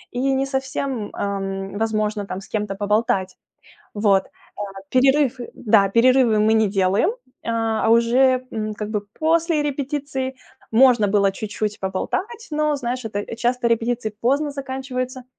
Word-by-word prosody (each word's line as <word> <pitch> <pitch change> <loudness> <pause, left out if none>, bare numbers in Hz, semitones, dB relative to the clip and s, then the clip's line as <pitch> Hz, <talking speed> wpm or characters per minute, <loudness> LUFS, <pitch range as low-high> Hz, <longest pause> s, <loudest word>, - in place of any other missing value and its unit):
и - - -1 0.2
не 270 +1 +1
совсем, 265 -4 -3
эм, 195 0 -3
возможно 215 -2 -1
там 190 - -5
с 195 - -13
кем-то 210 -2 -3
поболтать. 200 -2 0 0.6
Вот, 205 -2 +3
э, - - -20 0.7
перерыв, 270 0 +4 0.2
да, 210 -3 +3
перерывы 235 +1 +4
мы 220 +1 +4
не 220 -2 +3
делаем, 195 - +2 0.3
а, 225 -1 0
уже, 250 +3 +4
м, 215 -1 -3
как 210 0 -5
бы 210 -2 -1 0.2
после 325 -1 +2
репетиции 275 -2 -3 0.4
можно 240 -2 +5
было 200 -1 +3
чуть-чуть 210 +1 -4
поболтать, 380 - -3
но 300 -1 +1
знаешь, 250 -1 -3
это, 215 +1 -4
часто 240 +1 +1
репетиции 230 0 0
поздно 280 +5 +1
заканчиваются, 260 -2 -5
230 Hz, 135 wpm, -22 LUFS, 210-265 Hz, 0.7 s, можно